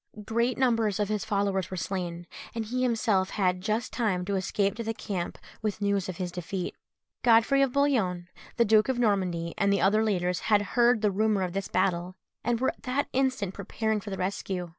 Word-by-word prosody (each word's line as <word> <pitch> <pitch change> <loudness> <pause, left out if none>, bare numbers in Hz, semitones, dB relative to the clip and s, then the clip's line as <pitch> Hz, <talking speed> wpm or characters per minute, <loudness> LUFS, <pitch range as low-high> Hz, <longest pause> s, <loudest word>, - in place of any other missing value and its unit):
Great 235 +3 0
numbers 230 -6 +2
of 205 -1 0
his 210 -1 -1
followers 200 -3 0
were 185 - -5
slain, 175 -1 -3 0.3
and 225 -1 -2
he 250 +4 -2
himself 225 -6 +2
had 185 -3 0
just 215 +3 -2
time 195 -7 0
to 200 +1 -1
escape 195 +1 0
to 230 - -5
the 225 0 -3
camp 185 -5 -4 0.2
with 215 -2 -1
the 205 - -3
news 200 -2 0
of 180 - -5
his 180 -2 -3
defeat. 180 +1 -4 0.5
Godfrey 240 +4 +5
of 270 -2 +3
Bouillon, 225 -11 +1 0.3
the 235 - +4
Duke 215 +2 +4
of 260 - +1
Normandy, 185 -7 0
and 200 0 +3
the 200 - +2
other 215 +3 +4
leaders 180 -4 0
had 210 -2 +2
heard 240 -2 +4
the 210 - +3
rumour 210 0 +1
of 180 -1 -3
this 195 0 -2
battle, 180 0 0 0.3
and 235 -1 0
were 260 - +2
at - - -8
that 265 +2 -1
instant 255 -8 0
preparing 215 +2 -2
for 205 - -7
the 190 - -4
rescue. 185 -1 -3
205 Hz, 205 wpm, -28 LUFS, 185-230 Hz, 0.5 s, Godfrey